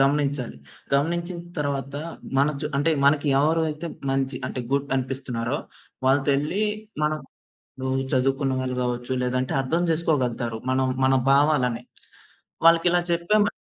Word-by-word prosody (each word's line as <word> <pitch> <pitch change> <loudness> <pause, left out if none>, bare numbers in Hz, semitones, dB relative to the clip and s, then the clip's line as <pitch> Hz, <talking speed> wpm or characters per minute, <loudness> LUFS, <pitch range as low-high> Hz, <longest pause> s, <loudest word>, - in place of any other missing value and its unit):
గమనించాలి. 140 - +1 0.4
గమనించిన 170 +5 0 0.2
తరువాత 140 -1 -2 0.4
మన 140 +2 +4
చు 150 - -2
అంటే 145 +4 +2
మనకి 145 +1 +4
ఎవరయితే 160 +2 +1 0.2
మంచి 135 -1 0
అంటే 130 - -4
గుడ్ 140 0 0
అనిపిస్తున్నారో 130 -1 -2 0.5
వాళ్ళతో 135 +1 +3
ఎళ్లి 165 +9 -1 0.4
మనం 155 0 +1 0.6
ఇపుడు 130 0 -2 0.2
చదువుకున్న 135 +1 +1
వాళ్ళు 130 0 -2
గావచ్చు, 125 0 -2
లేదంటే 125 +1 -1
అర్థం 165 +7 0
జేసుకోగలుగుతారు. 130 -8 0
మనం 130 0 +2 0.2
మన 135 - +4 0.2
భావాలని 135 -4 +3 0.8
వాళ్ళకి 165 +1 +5
ఇలా 175 - +3
చెప్పామను 205 +5 +2
140 Hz, 125 wpm, -24 LUFS, 130-155 Hz, 0.8 s, వాళ్ళకి